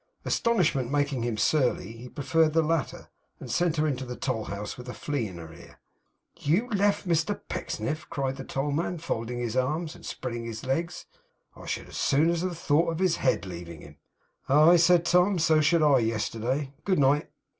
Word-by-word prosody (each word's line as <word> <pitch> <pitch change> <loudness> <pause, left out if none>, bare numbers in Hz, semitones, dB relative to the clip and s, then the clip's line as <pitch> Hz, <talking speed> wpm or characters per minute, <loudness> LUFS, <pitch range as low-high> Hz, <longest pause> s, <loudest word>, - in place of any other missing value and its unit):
Astonishment 160 - +1
making 145 -2 0
him 115 -2 -2
surly, 125 -7 +1
he 115 +2 -10
preferred 155 +2 +1
the 165 0 +3
latter, 155 -4 -2 0.3
and - - -7
sent 175 -2 +1
her 155 - +2
into 135 -4 -1
the 125 -1 -6
toll 120 -5 -2
house 100 +1 -5
with 125 0 -10
a - - -6
flea 140 -7 -2
in 90 -3 -9
her 80 -1 -10
ear. 85 - -15 0.6
'You 185 +12 +1
left 205 -1 +1
Mr 170 +4 +1
Pecksniff!' 155 0 -4
cried 135 -1 -2
the 135 - -6
tollman, 145 +7 -2
folding 120 -6 -3
his 120 -1 -3
arms, 155 +6 -1
and - - -15
spreading 120 -2 -5
his 115 +1 -6
legs. 165 +7 -2 0.5
'I - - -12
should - - -3
as - - -8
soon 150 +3 +3
have 175 0 -2
thought 165 +1 +2
of 165 - -4
his 180 -2 +2
head 130 -9 +1
leaving 85 -3 -8
him.' - - -14 0.5
'Aye!' 155 +5 +7
said 175 0 +4
Tom, 180 +3 +3
'so 155 -1 +3
should 155 +2 +3
I, 140 -3 +5
yesterday. 115 +5 -2
Good 190 -2 +1
night! 145 +2 +3
145 Hz, 190 wpm, -27 LUFS, 120-165 Hz, 0.6 s, Aye